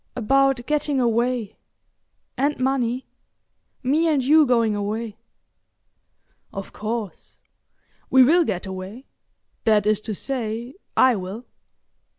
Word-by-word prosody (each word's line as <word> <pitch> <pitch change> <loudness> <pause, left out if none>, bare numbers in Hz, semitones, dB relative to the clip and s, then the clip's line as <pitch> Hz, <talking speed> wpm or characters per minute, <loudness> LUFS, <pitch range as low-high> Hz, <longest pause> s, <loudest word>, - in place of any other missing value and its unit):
"About 270 +1 +2
getting 295 -2 0
away—and 245 +3 -3
money. 255 -1 0 0.8
Me 300 +6 +2
and 295 -5 +2
you 300 +2 +5
going 230 -3 +2
away." 210 +1 -4 1.3
"Of 195 0 -7
course. 215 -2 -5 0.7
We 260 -1 +7
will 335 +7 +5
get 200 - -3
away—that 205 +2 -4
is 215 0 +2
to 215 -1 -5
say, 235 0 -3 0.2
I 255 -2 +5
will." 195 +5 -6
240 Hz, 100 wpm, -23 LUFS, 215-270 Hz, 1.3 s, We